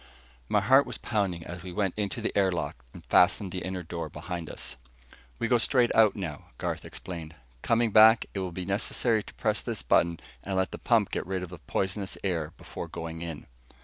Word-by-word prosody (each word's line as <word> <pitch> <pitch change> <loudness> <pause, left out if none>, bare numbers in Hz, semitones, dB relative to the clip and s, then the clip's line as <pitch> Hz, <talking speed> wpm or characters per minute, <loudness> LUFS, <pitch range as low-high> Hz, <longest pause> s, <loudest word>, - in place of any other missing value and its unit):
My 105 - +3
heart 130 +7 +5
was - - -4
pounding 95 -7 -1
as 90 0 -7
we 90 +1 -7
went 95 0 0
into 100 -3 -2
the - - -2
air 95 -2 +4
lock 75 -7 -4
and - - -13
fastened 95 +1 +4
the 90 - -3
inner 95 -1 -4
door 80 -1 -5
behind 85 +1 -6
us. - - -6 0.6
"We - - -1
go 120 -1 +4
straight 120 +1 +3
out 110 -3 +5
now," 85 -8 -5
Garth - - -3
explained. 85 -3 -7 0.3
"Coming 115 -1 +2
back, 110 +2 +7
it 100 - -2
will 95 -2 -3
be 90 +1 -5
necessary 110 +3 +1
to - - -13
press - - 0
this - - -4
button 85 +7 +3 0.2
and 95 - -3
let 95 - +1
the - - -6
pump 115 -4 +2
get - - -3
rid 95 -1 -2
of 90 - -6
the 90 -2 -10
poisonous, 95 +3 -2
air 85 -5 -1
before - - -7
going 80 0 -6
in." 85 -3 -6
95 Hz, 210 wpm, -28 LUFS, 85-105 Hz, 0.6 s, back